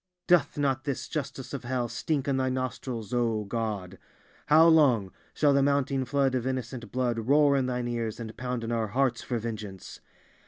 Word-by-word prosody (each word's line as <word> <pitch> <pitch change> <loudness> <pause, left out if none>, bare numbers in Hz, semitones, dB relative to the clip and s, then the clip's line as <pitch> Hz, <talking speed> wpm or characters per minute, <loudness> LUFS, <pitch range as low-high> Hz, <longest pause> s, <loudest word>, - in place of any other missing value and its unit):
Doth 175 -7 +3
not 135 -2 0
this 140 -3 -3
justice 140 -3 -5
of 140 - -4
hell 120 0 -1
stink 135 +4 -2
in 135 -1 +1
Thy 130 0 +1
nostrils, 130 -3 -4
O 115 -3 +1
God? 100 -3 -4 0.5
How 160 +2 +7
long 130 - +4 0.2
shall 145 -2 +4
the 140 - +4
mounting 140 -1 +1
flood 135 0 +1
of 130 -1 -1
innocent 130 -2 -4
blood 125 -2 0
roar 140 +4 +4
in 130 -2 +1
Thine 125 -1 -2
ears 115 -2 -3
and 110 -2 -7
pound 125 -2 -3
in 115 - -3
our 115 -2 0
hearts 125 +2 0
for 120 - -3
vengeance? 105 -4 -6
125 Hz, 185 wpm, -28 LUFS, 115-140 Hz, 0.5 s, How